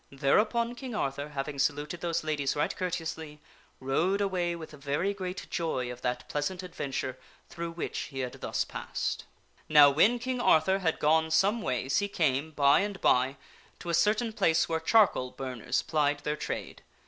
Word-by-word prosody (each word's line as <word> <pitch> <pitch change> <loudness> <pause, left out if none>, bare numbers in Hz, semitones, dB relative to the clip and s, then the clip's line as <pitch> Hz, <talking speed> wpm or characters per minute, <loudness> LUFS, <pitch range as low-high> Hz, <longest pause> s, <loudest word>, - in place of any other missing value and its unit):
Thereupon 215 - +2
King 245 -1 -7
Arthur, 140 -4 -2
having 140 0 -4
saluted 145 +4 -1
those 170 -1 -1
ladies 150 -3 -1
right 150 - 0
courteously, 160 -4 -4 0.4
rode 160 +9 +1
away 180 -4 0
with 160 -2 -9
very 150 +7 -2
great 185 -1 -5
joy 130 -7 -2
of 125 0 -9
that 125 0 -2
pleasant 180 +6 -3
adventure 135 -6 -4 0.3
through 170 0 -5
which 165 - -4
he 135 -2 -5
had 125 -1 -6
thus - - -1
passed. - - -4 0.4
Now 145 -2 +8
when 205 - +4
King 250 +1 -3
Arthur 190 +2 +4
had 165 -4 0
gone 160 +1 +3
some 200 +8 +2
ways 135 - 0
he 205 - -1
came, 155 -6 0
by 145 -2 +4
and 200 -1 -2
by, 130 +2 +2 0.4
to 175 - -5
a - - -2
certain 215 +6 +2
place 165 -7 +2
where 160 -1 -1
charcoal 170 - +3
burners 130 -3 -3
plied 145 -2 0
their 150 0 -2
trade. - - -5
160 Hz, 170 wpm, -29 LUFS, 140-185 Hz, 0.4 s, Now